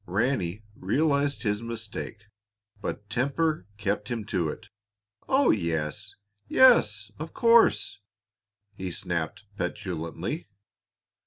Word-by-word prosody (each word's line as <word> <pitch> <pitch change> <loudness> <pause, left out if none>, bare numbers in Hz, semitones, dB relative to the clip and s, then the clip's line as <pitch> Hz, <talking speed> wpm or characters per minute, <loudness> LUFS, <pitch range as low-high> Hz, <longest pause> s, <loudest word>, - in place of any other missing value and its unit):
Ranny 105 -1 0
realized 140 +7 +1
his 105 -1 0
mistake, 115 -2 -5 0.6
but 105 0 -4
temper 140 - 0
kept 105 +1 -1
him 115 -3 -3
to 90 -6 0
it. 95 +5 -8 0.6
"Oh, 270 +1 +5
yes! 80 -6 -2 0.3
yes, 110 - +5
of 155 +2 -7
course," 230 - +4 0.7
he 95 -1 -5
snapped 85 +2 -3
petulantly. 90 - -3
105 Hz, 95 wpm, -27 LUFS, 90-140 Hz, 0.7 s, Oh